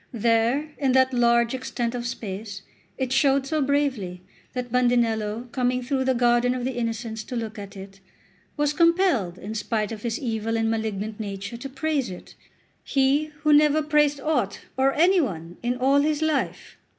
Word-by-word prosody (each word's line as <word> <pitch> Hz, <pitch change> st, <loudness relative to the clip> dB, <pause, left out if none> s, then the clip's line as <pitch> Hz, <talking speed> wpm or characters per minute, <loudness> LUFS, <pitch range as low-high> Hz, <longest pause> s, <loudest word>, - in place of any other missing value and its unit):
There, 235 Hz, +6 st, +1 dB
in 270 Hz, -3 st, +2 dB
that 260 Hz, 0 st, +4 dB
large 235 Hz, -1 st, +3 dB
extent 250 Hz, -2 st, -3 dB
of 245 Hz, -1 st, -3 dB
space, 205 Hz, -3 st, -6 dB, 0.3 s
it 260 Hz, -2 st, -2 dB
showed 275 Hz, -1 st, +3 dB
so 305 Hz, +2 st, -1 dB
bravely 265 Hz, -11 st, 0 dB, 0.3 s
that 250 Hz, -1 st, -4 dB
Bandinello, 235 Hz, -2 st, +1 dB
coming 250 Hz, -1 st, 0 dB
through 265 Hz, +1 st, -1 dB
the 260 Hz, 0 st, +2 dB
garden 240 Hz, +1 st, +3 dB
of 250 Hz, -1 st, -3 dB
the 260 Hz, -, -2 dB
Innocents 225 Hz, -2 st, -3 dB
to 250 Hz, -, -6 dB
look 220 Hz, -2 st, -4 dB
at 200 Hz, 0 st, -9 dB
it, 195 Hz, 0 st, -11 dB, 0.6 s
was 295 Hz, 0 st, +1 dB
compelled, 335 Hz, -, +2 dB
in 205 Hz, +3 st, -7 dB
spite 215 Hz, -1 st, -2 dB
of 220 Hz, -2 st, -6 dB
his 235 Hz, 0 st, -2 dB
evil 225 Hz, -3 st, -2 dB
and 225 Hz, 0 st, +1 dB
malignant 220 Hz, -1 st, -3 dB
nature, 200 Hz, +1 st, -5 dB
to 275 Hz, +4 st, -7 dB
praise 275 Hz, 0 st, -1 dB
it, 180 Hz, -, -10 dB, 0.5 s
he 275 Hz, +2 st, +2 dB, 0.2 s
who 305 Hz, -1 st, +5 dB
never 300 Hz, +1 st, +5 dB
praised 295 Hz, -1 st, +2 dB
aught 250 Hz, -10 st, -1 dB
or 265 Hz, +1 st, +3 dB
any 355 Hz, +4 st, +4 dB
one 175 Hz, -, -5 dB
in 245 Hz, +1 st, -1 dB
all 270 Hz, +3 st, +3 dB
his 300 Hz, +1 st, +1 dB
life! 310 Hz, -3 st, -2 dB
245 Hz, 175 wpm, -24 LUFS, 220-275 Hz, 0.6 s, who